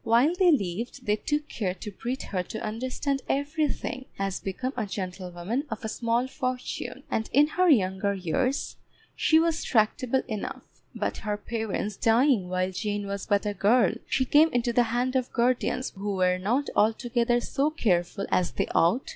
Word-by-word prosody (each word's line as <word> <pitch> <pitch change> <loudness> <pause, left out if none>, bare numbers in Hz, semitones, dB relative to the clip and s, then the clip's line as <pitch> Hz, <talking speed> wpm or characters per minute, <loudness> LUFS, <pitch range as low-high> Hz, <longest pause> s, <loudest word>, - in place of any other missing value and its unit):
While 240 +8 +4
they 360 -1 +4
lived 215 - -2
they 210 - +3
took 295 +6 -2
care 185 -5 -2
to 210 +3 -7
breed 245 +7 -4
her 185 -2 -2
to 200 +5 -6
understand 260 +5 -2
everything 285 -2 -1
as 195 -1 -2
became 255 +8 -4
a 220 -4 -2
gentlewoman 185 - -4
of 225 -1 -5
a - - -2
small 235 +2 0
fortune, 255 -2 -4
and 220 - -1
in 290 +3 +6
her 365 +2 +2
younger 200 - +2
years 250 - -1 0.4
she 315 - +4
was 330 0 +2
tractable 245 +3 +1
enough; 215 -4 -5 0.3
but - - -2
her 210 -1 -3
parents 215 -2 -3
dying 230 -4 +3
while 185 +1 0
Jane 205 +1 -2
was 200 0 -4
but 205 +1 +2
a 205 - 0
girl, 205 +2 +3
she 260 - +1
came 300 +5 +5
into 240 0 +1
the 245 - +5
hand 250 +3 0
of 255 -1 0
guardians 255 +1 +1
who 200 0 -4
were 180 -1 +2
not 245 +10 0
altogether 235 +2 +2
so 275 +4 0
careful 195 - 0
as 180 - +2
they - - 0
ought. 180 +11 +3
230 Hz, 170 wpm, -27 LUFS, 200-260 Hz, 0.4 s, in